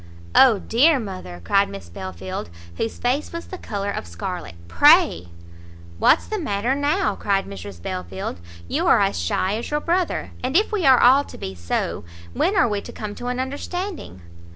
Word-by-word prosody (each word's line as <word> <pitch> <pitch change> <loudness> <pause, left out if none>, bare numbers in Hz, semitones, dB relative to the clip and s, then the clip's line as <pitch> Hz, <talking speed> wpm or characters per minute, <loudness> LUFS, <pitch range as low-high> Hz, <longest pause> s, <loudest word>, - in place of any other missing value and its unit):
"O 250 -5 +7
dear 275 +10 +3
mother!" 185 - -7
cried 200 - +2
Miss 95 -3 -9
Belfield, 95 +1 -6 0.3
whose 225 - -3
face 260 +5 -1
was 335 0 -6
the 370 - -8
colour 200 -1 -3
of 90 - -5
scarlet, 85 - -6
"pray!" 85 0 +5 0.7
"What's - - +4
the 430 - -3
matter 240 - 0
now?" 290 +7 +1
cried 195 -1 0
Mrs 95 -1 -9
Belfield; 90 0 -5 0.3
"you - - -1
are - - +6
as - - +1
shy 185 - 0
as 235 - -5
your 295 - 0
brother; 350 +3 -1
and 260 +6 +2
if 425 +4 +2
we 385 -9 +1
are 260 -2 +7
all 265 +3 +6
to - - -11
be 95 - -6
so, 85 -2 -3 0.3
when 390 - +1
are 245 - +5
we 205 -2 -2
to - - -9
come 210 -2 -6
to 245 - -7
an 250 0 -2
understanding?" 285 - -5
210 Hz, 180 wpm, -22 LUFS, -, 0.7 s, O